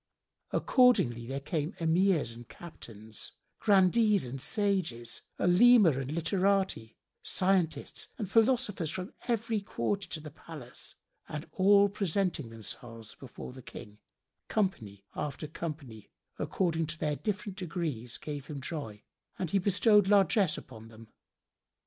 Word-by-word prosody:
Accordingly 120 - +3
there 135 +2 -3
came 155 +4 -3
Emirs 165 -4 +2
and 120 0 -12
Captains, 110 -10 -4 0.3
Grandees 205 - +4
and 130 +2 -6
Sages, 185 - -1 0.2
Olema 205 +1 +6
and 135 0 -3
literati, 185 - 0 0.2
scientists 180 -6 0
and 210 - -3
philosophers 220 - +2
from 185 +4 -5
every 230 -2 0
quarter 200 +3 -2
to 160 - -4
the 150 -1 -9
palace 150 -5 -10 0.3
and 150 +2 -5
all 200 +1 +5
presenting 190 - -1
themselves 115 0 -8
before 130 -1 -10
the 130 - -10
King, 105 -3 -11 0.5
company 110 - -2
after 150 +1 -4
company, 145 -9 -7 0.3
according 165 -4 0
to 165 +2 -4
their 150 -1 -1
different 205 +2 -3
degrees, 155 -10 -3
gave 145 -2 -6
him 145 -3 -6
joy, 130 -8 -6 0.3
and 180 -4 -3
he 200 - +3
bestowed 205 +1 +4
largesse 195 -3 +4
upon 110 -3 -11
them. 115 0 -14
165 Hz, 125 wpm, -30 LUFS, 130-195 Hz, 0.5 s, Olema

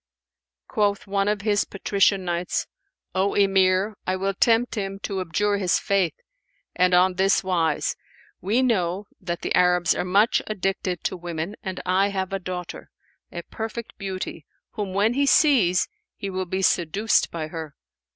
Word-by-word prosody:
Quoth 205 -3 0
one 200 0 0
of 210 -1 0
his 205 -1 +2
Patrician 195 -1 +1
Knights, 175 0 -1 0.5
"O 190 +1 +1
Emir, 195 +1 +3
I 185 - +1
will 195 +1 -1
tempt 230 +4 +2
him 195 -2 -3
to 195 -2 -2
abjure 205 +4 0
his 185 -3 +2
faith, 195 -4 0 0.6
and 180 0 +3
on 180 +1 +4
this 195 +1 +3
wise: 170 -5 0 0.5
we 220 +7 +1
know 195 -5 0
that 175 -2 -4
the - - -1
Arabs 180 -1 +3
are - - -2
much 200 +5 +3
addicted 195 -3 -2
to - - -1
women, 170 +2 -5
and 190 -4 -5
I 185 +2 +3
have 195 -1 -3
a 195 - -1
daughter, 180 -1 -6 0.4
a 170 - -6
perfect 225 +1 -6
beauty, 185 -5 -5 0.2
whom 200 -4 -4
when 210 +4 +3
he 280 +2 +1
sees, 235 - +4 0.3
he 195 - -5
will 185 0 -2
be 190 +2 -2
seduced 190 +5 +2
by 160 -2 -5
her." 160 -3 -7
190 Hz, 160 wpm, -24 LUFS, 180-205 Hz, 0.6 s, on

